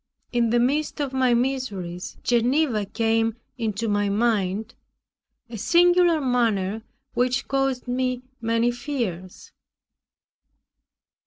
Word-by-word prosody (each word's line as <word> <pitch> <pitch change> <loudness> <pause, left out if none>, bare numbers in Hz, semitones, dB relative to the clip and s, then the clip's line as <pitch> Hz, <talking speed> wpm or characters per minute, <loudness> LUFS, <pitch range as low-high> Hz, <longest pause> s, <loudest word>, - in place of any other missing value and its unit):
In 235 -2 +2
the 240 +1 +3
midst 290 +6 0
of 280 -2 -2
my 255 -2 +3
miseries, 225 -9 -3
Geneva 240 -2 +2
came 225 +1 +1 0.2
into 225 0 -2
my 205 -1 +1
mind, 210 0 0 0.7
a 230 -2 -8
singular 350 - +4
manner, 225 -6 0 0.3
which 250 +2 0
caused 270 -2 -1
me 255 0 -1 0.2
many 230 +1 +1
fears. 235 - -5
240 Hz, 100 wpm, -24 LUFS, 215-260 Hz, 0.7 s, singular